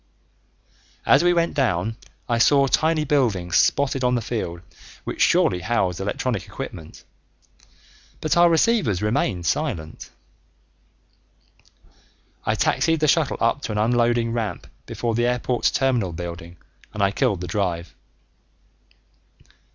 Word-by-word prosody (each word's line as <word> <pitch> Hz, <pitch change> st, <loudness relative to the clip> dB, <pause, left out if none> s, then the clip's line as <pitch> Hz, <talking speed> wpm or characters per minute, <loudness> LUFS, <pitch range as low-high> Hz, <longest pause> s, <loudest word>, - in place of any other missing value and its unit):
As 140 Hz, +4 st, +5 dB
we 175 Hz, -, +4 dB
went 170 Hz, -1 st, +1 dB
down 110 Hz, -, 0 dB, 0.3 s
I 120 Hz, -1 st, 0 dB
saw 140 Hz, +3 st, +5 dB
tiny 155 Hz, +3 st, +1 dB
buildings 110 Hz, -12 st, 0 dB
spotted 135 Hz, -2 st, +2 dB
on 125 Hz, 0 st, +2 dB
the 120 Hz, -, -1 dB
field 85 Hz, -7 st, -4 dB, 0.4 s
which -, -, -5 dB
surely 90 Hz, -, +3 dB
housed 90 Hz, -2 st, -1 dB
electronic 105 Hz, +5 st, -3 dB
equipment, 95 Hz, -12 st, -9 dB, 1.2 s
but 155 Hz, -, 0 dB
our 175 Hz, 0 st, +6 dB
receivers 165 Hz, -, +2 dB
remained 105 Hz, -6 st, -1 dB
silent. 80 Hz, -1 st, -3 dB, 2.4 s
I -, -, +2 dB
taxied 165 Hz, -1 st, +1 dB
the 155 Hz, -, +2 dB
shuttle 155 Hz, -1 st, +2 dB
up 115 Hz, +5 st, +1 dB
to -, -, -4 dB
an 105 Hz, -, -3 dB
unloading 120 Hz, +1 st, +1 dB
ramp 110 Hz, -7 st, -3 dB, 0.2 s
before 115 Hz, -1 st, -3 dB
the 120 Hz, +2 st, +1 dB
airport's 125 Hz, 0 st, 0 dB
terminal 125 Hz, -9 st, 0 dB
building 85 Hz, 0 st, -7 dB, 0.4 s
and 105 Hz, -, 0 dB
I 100 Hz, -, +3 dB
killed 100 Hz, -4 st, 0 dB
the 90 Hz, -, -5 dB
drive. 90 Hz, -2 st, -2 dB
115 Hz, 125 wpm, -22 LUFS, 95-135 Hz, 2.4 s, our